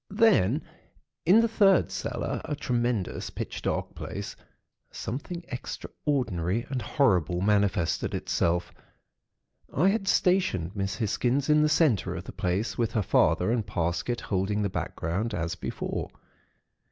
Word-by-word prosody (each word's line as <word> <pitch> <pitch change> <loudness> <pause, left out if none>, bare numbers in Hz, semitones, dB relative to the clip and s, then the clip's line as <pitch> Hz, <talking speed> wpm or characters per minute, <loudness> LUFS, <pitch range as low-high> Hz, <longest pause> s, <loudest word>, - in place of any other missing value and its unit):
"Then, 190 - +3 0.6
in 205 +6 +7
the 230 - +3
third 200 -4 +4
cellar, - - -3
a 150 - -2
tremendous, 120 -7 -1
pitch - - -5
dark - - -2
place, - - -6 0.5
something 170 +8 -5
extraordinary 120 - -2
and 130 -2 -1
horrible 90 - +2
manifested 100 -4 +1
itself. 85 +1 0 1.0
I 180 +7 +3
had 195 -1 -1
stationed 140 - +2
Miss 95 -1 -2
Hisgins 125 +6 +1
in 150 0 +5
the 150 - +3
centre 130 - +2
of 90 - -5
the - - -8
place, 95 +7 -2
with 115 -2 0
her 110 - +1
father 90 +2 +3
and 120 -2 +1
Parsket 90 +5 -2
holding 100 +2 -1
the 100 - 0
background, 95 +7 -2
as 85 0 -2
before. - - -4
115 Hz, 130 wpm, -27 LUFS, 95-150 Hz, 1.0 s, in